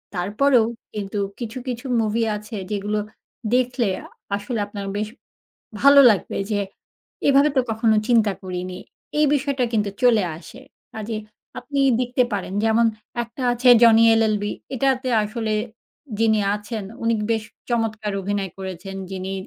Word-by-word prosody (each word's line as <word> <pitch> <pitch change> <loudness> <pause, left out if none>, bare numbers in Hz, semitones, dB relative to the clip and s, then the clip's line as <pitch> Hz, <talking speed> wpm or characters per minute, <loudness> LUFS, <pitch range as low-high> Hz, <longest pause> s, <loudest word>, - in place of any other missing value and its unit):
তারপরেও 220 +7 +3 0.3
কিন্তু 205 -1 -4 0.2
কিছু, 235 +1 -5
কিছু 245 +1 -4 0.2
মুভি 225 +1 0
আছে, 210 +1 -8 0.2
যেগুলো 210 +1 -1 0.6
দেখলে 250 -2 +1 0.2
আ - - -11 0.3
আসলে 210 +3 -4
আপনার 200 -1 -6
বেশ 210 0 -1 0.7
ভালো 280 0 +8
লাগবে, 200 - -1
যে 205 -1 +1 0.7
এভাবে 280 +2 +5
তো 260 - +6
কখনো 220 -1 +2
চিন্তা 220 -4 +4
করিনি। 185 0 -5 0.4
এই 300 - +5
বিষয়টা 280 -2 0
কিন্তু 210 -2 +1
চলে 235 -5 +5 0.2
আসে। 245 +8 -13 0.3
কাজেই 220 0 -4 0.4
আপনি 280 -1 -3 0.2
দেখতে 250 0 +1
পারেন, 195 -2 -3
যেমন 225 +1 +4 0.4
একটা 235 +3 -8
আছে 245 +1 +2
"জনি 230 -1 +7
এলএলবি।" 215 -2 +1 0.2
এটাতে 260 0 +1 0.2
আসলে 215 0 -2 0.7
যিনি 220 -1 +3 0.2
আছেন, 210 0 -6 0.2
উনি 230 0 +2 0.2
বেশ 220 -1 0 0.3
চমৎকার 220 -3 -1
অভিনয় 200 -1 -2
করেছেন, 190 +1 -6
যিনি 190 0 -4
220 Hz, 135 wpm, -22 LUFS, 205-245 Hz, 0.7 s, ভালো